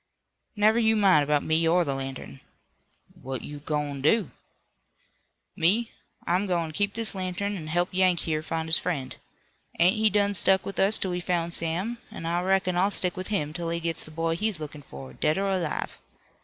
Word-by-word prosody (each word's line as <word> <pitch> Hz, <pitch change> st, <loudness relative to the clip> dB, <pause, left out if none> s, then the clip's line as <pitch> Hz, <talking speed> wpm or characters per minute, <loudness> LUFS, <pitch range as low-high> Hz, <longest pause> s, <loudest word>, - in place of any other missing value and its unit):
"Never 215 Hz, +2 st, +4 dB
you 220 Hz, -1 st, +3 dB
mind 190 Hz, -8 st, +5 dB
about 145 Hz, 0 st, +1 dB
me 160 Hz, +1 st, +2 dB
or 175 Hz, +2 st, +4 dB
the 140 Hz, -4 st, -2 dB
lantern." 135 Hz, -, -6 dB, 0.8 s
"What 130 Hz, -1 st, -5 dB
you 145 Hz, 0 st, -7 dB
goin' 145 Hz, -2 st, -3 dB
to 150 Hz, -, +5 dB
do?" 205 Hz, -, 0 dB, 1.2 s
"Me? 210 Hz, +8 st, +2 dB, 0.3 s
I'm 185 Hz, +4 st, +1 dB
goin' 170 Hz, -3 st, -1 dB
to -, -, -14 dB
keep 200 Hz, 0 st, 0 dB
this 225 Hz, -2 st, -2 dB
lantern 190 Hz, +2 st, -3 dB
an' 160 Hz, -5 st, -6 dB
help 175 Hz, +3 st, 0 dB
Yank 185 Hz, -2 st, +3 dB
here 155 Hz, -2 st, -1 dB
find 160 Hz, 0 st, -3 dB
his 160 Hz, -, +5 dB
friend. 140 Hz, -7 st, -3 dB, 0.6 s
Ain't 180 Hz, +5 st, +4 dB
he 215 Hz, 0 st, +4 dB
done 205 Hz, 0 st, +2 dB
stuck 190 Hz, 0 st, +3 dB
with 195 Hz, -, -5 dB
us 200 Hz, +3 st, +3 dB
till 190 Hz, -, -2 dB
we 180 Hz, -, -2 dB
found 170 Hz, -1 st, -1 dB
Sam, 180 Hz, +10 st, -1 dB
an' 165 Hz, -, -8 dB
I 170 Hz, +1 st, 0 dB
reckon 190 Hz, -1 st, +1 dB
I'll 190 Hz, +3 st, +3 dB
stick 180 Hz, -3 st, 0 dB
with 185 Hz, 0 st, -4 dB
him 155 Hz, -8 st, -1 dB
till 170 Hz, 0 st, -3 dB
he 170 Hz, 0 st, -1 dB
gits 165 Hz, -1 st, -3 dB
the -, -, -11 dB
boy 165 Hz, +1 st, -1 dB
he's 210 Hz, -1 st, -1 dB
lookin 150 Hz, -1 st, -7 dB
for, 70 Hz, -, -11 dB
dead 155 Hz, -, 0 dB
or 195 Hz, 0 st, 0 dB
alive. 175 Hz, -5 st, -2 dB
175 Hz, 200 wpm, -26 LUFS, 155-195 Hz, 1.2 s, mind